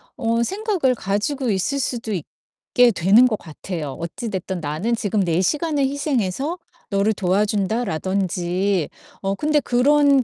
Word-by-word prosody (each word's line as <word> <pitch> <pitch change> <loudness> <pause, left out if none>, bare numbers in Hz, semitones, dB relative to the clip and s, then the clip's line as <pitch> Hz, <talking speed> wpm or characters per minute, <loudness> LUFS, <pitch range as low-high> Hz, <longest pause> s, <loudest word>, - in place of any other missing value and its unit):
어 230 -3 0
생각을 385 - 0
가지고 225 +7 -1
있을 195 +9 0
수도 230 -4 -2
있게 240 - 0
되는 200 +6 +5
것 215 -4 -1
같아요 160 -1 -6
'어찌 170 +7 -5
됐든 190 -2 -4
나는 160 +11 -1
지금 210 -1 -1
내 170 0 +1
시간을 295 - 0
희생해서 280 - -1 0.3
너를 200 +2 +2
도와준다.'라든지. 190 -2 0 0.3
어 195 0 -1
근데 300 +5 +2
그런 280 +1 +4
215 Hz, 285 characters per minute, -22 LUFS, 190-265 Hz, 0.3 s, 되는